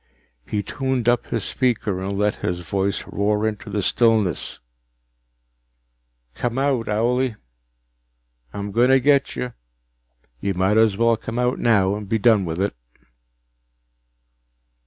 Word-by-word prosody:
He 105 -1 -2
tuned 130 -2 -2
up 120 0 +2
his 115 -4 -2
speaker 110 -7 -1
and 100 +1 -3
let 105 0 +1
his 90 0 -3
voice 95 +3 -1
roar 105 +1 0
into 105 -2 -5
the 105 -2 -2
stillness: 110 - +1 1.8
"Come 120 - -3
out, 135 -4 0
owlie! 120 +3 +1 1.2
I'm 100 +6 -5
going 120 +4 +3
to 135 0 +6
get 140 +1 +2
you, 125 -1 -4 0.9
you 100 +5 -2
might 95 +4 +2
as 110 -3 +4
well 115 0 +3
come 115 +2 -6
out 125 +1 0
now 100 -5 +3
and 105 -1 -6
be 115 - +2
done 110 -3 +3
with 80 +1 -4
it!" 100 +1 0
110 Hz, 135 wpm, -22 LUFS, 100-120 Hz, 1.8 s, to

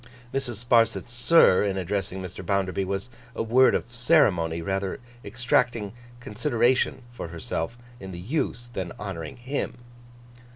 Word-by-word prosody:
Mrs. 135 -3 -1
Sparsit's 120 0 +3
'sir,' 120 - +5
in 100 -2 -1
addressing 95 0 -2
Mr. 90 +1 -7
Bounderby, 95 0 0
was 100 +5 -4 0.2
a - - -1
word 125 +4 +5
of 120 - -3
ceremony, 110 - +3
rather 95 +4 -2 0.2
exacting 115 -1 0 0.3
consideration 120 +2 +1
for 120 - -6
herself 85 +5 -4 0.2
in 95 0 -8
the 85 - -7
use, 120 - -2
than 95 -5 -4
honouring 95 -4 -6
him. 130 +4 -3
105 Hz, 130 wpm, -26 LUFS, 95-120 Hz, 0.3 s, sir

